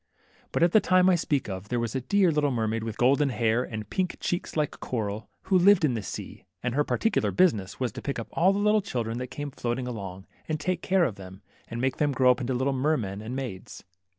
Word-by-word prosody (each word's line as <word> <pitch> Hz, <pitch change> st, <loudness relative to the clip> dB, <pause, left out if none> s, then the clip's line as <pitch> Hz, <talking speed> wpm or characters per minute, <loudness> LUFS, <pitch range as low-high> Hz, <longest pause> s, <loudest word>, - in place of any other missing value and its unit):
But -, -, +1 dB
at 170 Hz, -, +4 dB
the 215 Hz, -, +6 dB
time 185 Hz, -1 st, +4 dB
I -, -, +4 dB
speak 145 Hz, -5 st, -1 dB
of, 95 Hz, +1 st, -6 dB
there 120 Hz, -, 0 dB
was 115 Hz, -2 st, -2 dB
a 130 Hz, -, -1 dB
dear 190 Hz, +6 st, +3 dB
little 150 Hz, -1 st, +1 dB
mermaid, 115 Hz, -3 st, -1 dB
with 115 Hz, -1 st, -5 dB
golden 140 Hz, +3 st, +3 dB
hair 115 Hz, -1 st, +1 dB
and 110 Hz, -4 st, -6 dB
pink 185 Hz, -, -2 dB
chee*ks 175 Hz, -2 st, -3 dB
like 150 Hz, -2 st, -1 dB
coral, 110 Hz, -3 st, -4 dB
who 190 Hz, -1 st, +3 dB
lived 190 Hz, -2 st, +6 dB
in 135 Hz, -, +1 dB
this 110 Hz, -3 st, -4 dB
sea, -, -, -7 dB, 0.2 s
and 125 Hz, -1 st, -1 dB
her 145 Hz, +3 st, +2 dB
particular 225 Hz, +8 st, +1 dB
business 110 Hz, -, +1 dB
was 125 Hz, -3 st, -1 dB
to -, -, -8 dB
pick 140 Hz, -, -3 dB
up 115 Hz, -, -5 dB
all 180 Hz, +3 st, +3 dB
the 195 Hz, -, -1 dB
little 210 Hz, +1 st, +3 dB
children 120 Hz, -, -3 dB
that 125 Hz, -, -4 dB
came 145 Hz, +2 st, -6 dB
floating 125 Hz, 0 st, -3 dB
along, 95 Hz, -5 st, -6 dB, 0.2 s
and 155 Hz, -1 st, -1 dB
take 175 Hz, +3 st, -1 dB
care 190 Hz, -1 st, +2 dB
of 120 Hz, -11 st, -1 dB
them, 95 Hz, 0 st, -11 dB, 0.2 s
and 115 Hz, -, -5 dB
make 130 Hz, +1 st, 0 dB
them 145 Hz, -2 st, +1 dB
grow 130 Hz, -1 st, +5 dB
up 125 Hz, -, -1 dB
into 125 Hz, +1 st, -1 dB
little 130 Hz, +2 st, 0 dB
mermen 130 Hz, -8 st, -1 dB
and 115 Hz, +4 st, -5 dB
maids. 125 Hz, -9 st, -6 dB
130 Hz, 240 wpm, -27 LUFS, 115-160 Hz, 0.2 s, the